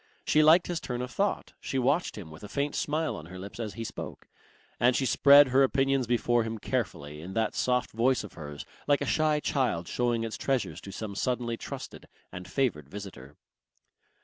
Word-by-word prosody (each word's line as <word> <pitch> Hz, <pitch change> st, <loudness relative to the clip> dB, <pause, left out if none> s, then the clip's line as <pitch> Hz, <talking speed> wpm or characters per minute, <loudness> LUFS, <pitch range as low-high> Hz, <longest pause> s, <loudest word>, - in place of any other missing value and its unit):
She 155 Hz, -, +4 dB
liked 160 Hz, +3 st, +6 dB
his 175 Hz, -2 st, -3 dB
turn 125 Hz, -1 st, -3 dB
of 125 Hz, -, -6 dB
thought, 200 Hz, +7 st, -1 dB
she 135 Hz, -, -3 dB
watched 140 Hz, +5 st, +1 dB
him 90 Hz, -7 st, -8 dB
with 75 Hz, -, -12 dB
a 105 Hz, -, -8 dB
faint 140 Hz, +3 st, -1 dB
smile 155 Hz, +2 st, -1 dB
on 75 Hz, -, -9 dB
her 90 Hz, +1 st, -9 dB
lips 100 Hz, +4 st, -9 dB
as 110 Hz, -3 st, -4 dB
he 115 Hz, -, -4 dB
spoke, -, -, -7 dB, 0.5 s
and 125 Hz, +1 st, +4 dB
she 135 Hz, -, +1 dB
spread 140 Hz, +1 st, +7 dB
her 130 Hz, +2 st, +4 dB
opinions 135 Hz, -1 st, +2 dB
before 120 Hz, 0 st, +2 dB
him 110 Hz, 0 st, -4 dB
carefully 75 Hz, -7 st, -3 dB
in 90 Hz, +4 st, -8 dB
that 110 Hz, -1 st, +1 dB
soft 125 Hz, 0 st, 0 dB
voice 125 Hz, +4 st, +2 dB
of 105 Hz, -, -10 dB
hers 75 Hz, -2 st, -8 dB, 0.2 s
like 145 Hz, -1 st, +3 dB
a -, -, 0 dB
shy 155 Hz, -1 st, +2 dB
child 125 Hz, -, 0 dB
showing 120 Hz, -2 st, 0 dB
its 115 Hz, -1 st, -4 dB
treasures 135 Hz, -3 st, -1 dB
to 100 Hz, -, -9 dB
some 105 Hz, 0 st, -5 dB
suddenly 120 Hz, +1 st, -1 dB
trusted -, -, -8 dB, 0.2 s
and 90 Hz, +1 st, -8 dB
favoured 90 Hz, -, -1 dB
visitor. 85 Hz, -9 st, -9 dB
120 Hz, 200 wpm, -29 LUFS, 100-135 Hz, 0.5 s, spread